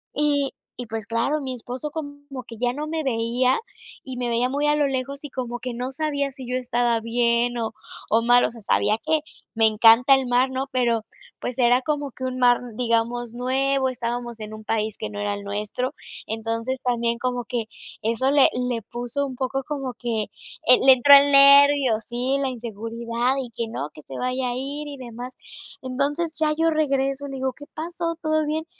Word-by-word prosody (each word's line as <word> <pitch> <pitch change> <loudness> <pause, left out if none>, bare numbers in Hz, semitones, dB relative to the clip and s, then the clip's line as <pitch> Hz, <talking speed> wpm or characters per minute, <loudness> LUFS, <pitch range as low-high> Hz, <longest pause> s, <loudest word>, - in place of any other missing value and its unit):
Y 290 -2 +1 0.3
y, 245 - -6
pues 220 -1 -5
claro, 250 +7 0
mi 260 -2 -4
esposo 250 +4 -6
como 285 -3 -7
que 230 - -9
ya 245 0 +1
no 300 +3 -4
me 320 0 -2
veía 245 0 +1 0.4
y 260 -2 -7
me 245 -1 -2
veía 235 +2 +1
muy 285 +2 -1
a 295 - +3
lo 295 -1 +2
lejos 275 +1 -3
y 295 - -6
como 245 -2 -4
que 250 +1 -5
no 250 +2 -3
sabía 285 -1 -1
si 260 -2 -10
yo 250 - -1
estaba 240 -2 +1
bien 235 +1 +1
o 225 -1 -3 0.4
o 225 +1 +3
mal, 245 +1 +5
o - - 0
sea, 230 -1 -12
sabía 215 +1 +2
que 315 0 +3 0.4
me 225 0 +5
encanta 225 +5 +6
el 265 -1 0
mar, 250 +2 +3
¿no? 260 +1 -2
Pero 235 -3 +1 0.3
pues 250 +1 -5
era 245 +1 +4
como 290 0 -2
que 260 - -10
un 255 0 -3
mar, 245 -1 +5 0.2
digamos, 235 0 0
nuevo, 265 +2 +1
estábamos 240 -1 -4
en 215 0 -7
un 215 0 -9
país 215 -1 -1
que 215 - -4
no 205 - -6
era 205 0 -1
el 200 - -8
nuestro, 210 +6 -3 0.3
entonces 230 +3 -3
también 235 -1 0
como 245 0 -2
que 235 -2 -2 0.4
eso 230 +5 +1
le 285 -2 +6
le 250 -2 -1
puso 245 +5 -3
un 260 - -7
poco 270 +1 -2
como 270 -4 -3
que, 230 -3 -2 0.4
eh, 250 +1 +7
le 265 - +8
entró 260 +3 +6
el 285 0 +6
nervio, 280 -3 +7
sí, 250 +3 -1
la 275 - 0
inseguridad 235 +1 -2
y 245 -3 -8
que 230 0 -4
no, 150 -9 -4
que - - -12
se 135 - -8
vaya 255 0 -1
a 245 - -3
ir 285 +3 -4
y 285 - -6
demás. 245 0 -8 0.5
Entonces 290 +6 -1
ya 310 -1 +2
yo 325 0 +3
regreso, 275 -2 0
le 275 - -6
digo: 260 0 -1
"¿Qué 290 - -12
pasó? 335 +1 -3
¿Todo 310 0 +1
bien?" 315 +1 -2
250 Hz, 205 wpm, -23 LUFS, 235-275 Hz, 0.5 s, le